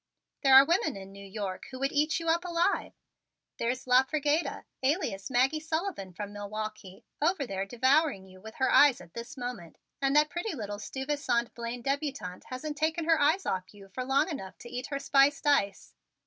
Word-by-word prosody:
There 270 Hz, -1 st, +6 dB
are 270 Hz, +1 st, +10 dB
women 320 Hz, -, +1 dB
in 195 Hz, 0 st, -10 dB
New 200 Hz, 0 st, -11 dB
York 195 Hz, -1 st, -5 dB
who 260 Hz, -, -8 dB
would 275 Hz, +2 st, -1 dB
eat 305 Hz, +3 st, +1 dB
you 330 Hz, -, -6 dB
up 335 Hz, +2 st, +2 dB
alive. 350 Hz, +2 st, 0 dB, 0.7 s
There's 245 Hz, +2 st, -1 dB
La 250 Hz, 0 st, +6 dB
Frigeda, 300 Hz, +3 st, -1 dB, 0.2 s
alias 260 Hz, -, -1 dB
Maggie 265 Hz, +4 st, +2 dB
Sullivan 315 Hz, -, -3 dB
from 205 Hz, +3 st, -7 dB
Milwaukee, 210 Hz, -1 st, -6 dB, 0.2 s
over 315 Hz, -2 st, +1 dB
there 195 Hz, -3 st, -3 dB
devouring 260 Hz, -1 st, +2 dB
you 185 Hz, 0 st, -16 dB
with 220 Hz, +2 st, -10 dB
her 260 Hz, -, +1 dB
eyes 285 Hz, -4 st, +6 dB
at 170 Hz, -1 st, -14 dB
this 235 Hz, +2 st, -8 dB
moment, 245 Hz, -10 st, -6 dB, 0.2 s
and 275 Hz, +1 st, +2 dB
that 300 Hz, 0 st, +4 dB
pretty 345 Hz, +1 st, -3 dB
little 205 Hz, -4 st, -5 dB
Stuyvesant 265 Hz, -1 st, -2 dB
Blaine 235 Hz, +1 st, -5 dB
debutante 275 Hz, -10 st, -3 dB
hasn't 295 Hz, +4 st, -5 dB
taken 315 Hz, +2 st, 0 dB
her 325 Hz, -2 st, +3 dB
eyes 320 Hz, +7 st, +3 dB
off 185 Hz, -1 st, -2 dB
of -, -, -19 dB
you 195 Hz, -1 st, -14 dB
long 270 Hz, +4 st, +1 dB
enough 275 Hz, -, -6 dB
to 240 Hz, -, -11 dB
eat 250 Hz, +1 st, -4 dB
her 280 Hz, -, -3 dB
spiced 275 Hz, +1 st, +3 dB
ice. 200 Hz, -10 st, +1 dB
265 Hz, 190 wpm, -29 LUFS, 205-300 Hz, 0.7 s, are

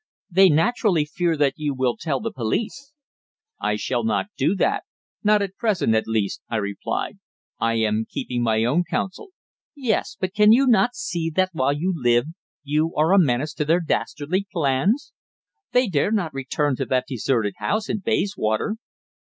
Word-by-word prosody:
"They 190 Hz, +2 st, +6 dB
naturally 175 Hz, 0 st, +2 dB
fear 165 Hz, +1 st, -1 dB
that 145 Hz, -2 st, +2 dB
you 145 Hz, -2 st, -2 dB
will 130 Hz, -2 st, 0 dB
tell 150 Hz, -5 st, -2 dB
the 230 Hz, +1 st, -4 dB
police." 220 Hz, -, -3 dB, 0.7 s
"I 105 Hz, -, 0 dB
shall 120 Hz, +3 st, -2 dB
not 110 Hz, -, 0 dB
do 190 Hz, -, +1 dB
that 405 Hz, -, +1 dB, 0.4 s
not 210 Hz, -1 st, +4 dB
at 195 Hz, -1 st, -5 dB
present, 210 Hz, -, +1 dB
at 110 Hz, -, +1 dB
least," 110 Hz, -3 st, -1 dB
I 115 Hz, -, -2 dB
replied. 100 Hz, -2 st, -3 dB, 0.4 s
"I 115 Hz, 0 st, +1 dB
am 110 Hz, 0 st, 0 dB
keeping 120 Hz, -1 st, -3 dB
my 110 Hz, -1 st, +2 dB
own 145 Hz, +10 st, +2 dB
counsel." 185 Hz, -, -3 dB, 0.5 s
"Yes. 250 Hz, -7 st, -1 dB
But 185 Hz, -1 st, -2 dB
cannot 210 Hz, +1 st, +6 dB
you 245 Hz, -5 st, +4 dB
see 170 Hz, -5 st, -3 dB
that 185 Hz, +3 st, +1 dB
while 140 Hz, -2 st, +1 dB
you 175 Hz, +6 st, -1 dB
live 120 Hz, -4 st, +2 dB, 0.4 s
you 155 Hz, +3 st, 0 dB
are 160 Hz, +5 st, +3 dB
a 200 Hz, -, +7 dB
menace 145 Hz, -2 st, +1 dB
to 155 Hz, -, -1 dB
their 165 Hz, +4 st, +3 dB
dastardly 175 Hz, +2 st, -2 dB
plans? 170 Hz, -, 0 dB, 0.6 s
They 250 Hz, 0 st, +3 dB
dare 175 Hz, +2 st, +1 dB
not 180 Hz, -8 st, 0 dB
return 135 Hz, +1 st, -1 dB
to 135 Hz, -, -2 dB
that 130 Hz, -1 st, +1 dB
deserted 115 Hz, -4 st, 0 dB
house 215 Hz, 0 st, -1 dB
in 210 Hz, -, -2 dB
Bayswater." 200 Hz, -, -1 dB
160 Hz, 170 wpm, -23 LUFS, 125-200 Hz, 0.7 s, a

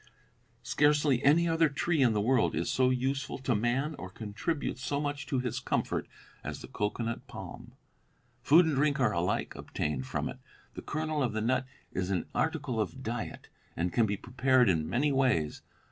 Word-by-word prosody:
Scarcely 145 Hz, +1 st, +3 dB
any 160 Hz, +5 st, +5 dB
other 165 Hz, -1 st, +3 dB
tree 155 Hz, +2 st, 0 dB
in 120 Hz, -4 st, +5 dB
the 105 Hz, -, +1 dB
world 125 Hz, +2 st, +2 dB
is -, -, -1 dB
so 130 Hz, -1 st, +3 dB
useful 135 Hz, +2 st, -1 dB
to 130 Hz, -1 st, 0 dB
man 120 Hz, +8 st, 0 dB
or 90 Hz, -, -6 dB
contributes 110 Hz, -, -3 dB
so 140 Hz, +2 st, -1 dB
much 145 Hz, -1 st, -3 dB
to 135 Hz, -, 0 dB
his 125 Hz, -1 st, -1 dB
comfort -, -, -1 dB, 0.4 s
as -, -, -5 dB
the -, -, -9 dB
cocoanut 115 Hz, +3 st, -3 dB
palm. -, -, -9 dB, 0.7 s
Food 160 Hz, +8 st, +6 dB
and 160 Hz, -, +1 dB
drink 140 Hz, +1 st, +2 dB
are 120 Hz, -5 st, +3 dB
alike 85 Hz, +1 st, 0 dB
obtained 65 Hz, -4 st, -3 dB
from -, -, -2 dB
it. -, -, -7 dB, 0.3 s
The -, -, -7 dB
kernel 155 Hz, 0 st, -2 dB
of 120 Hz, -5 st, 0 dB
the 110 Hz, -, -1 dB
nut 130 Hz, +3 st, +1 dB, 0.2 s
is 95 Hz, 0 st, -2 dB
an 95 Hz, -3 st, 0 dB
article 145 Hz, -5 st, 0 dB
of 130 Hz, +5 st, -4 dB
diet, 120 Hz, +1 st, -5 dB, 0.3 s
and 85 Hz, 0 st, -1 dB
can 115 Hz, +2 st, +3 dB
be 100 Hz, 0 st, -1 dB
prepared 130 Hz, +1 st, +3 dB
in 80 Hz, -4 st, +1 dB
many 145 Hz, +4 st, +2 dB
ways. 125 Hz, -, +1 dB
130 Hz, 180 wpm, -30 LUFS, 110-145 Hz, 0.7 s, Food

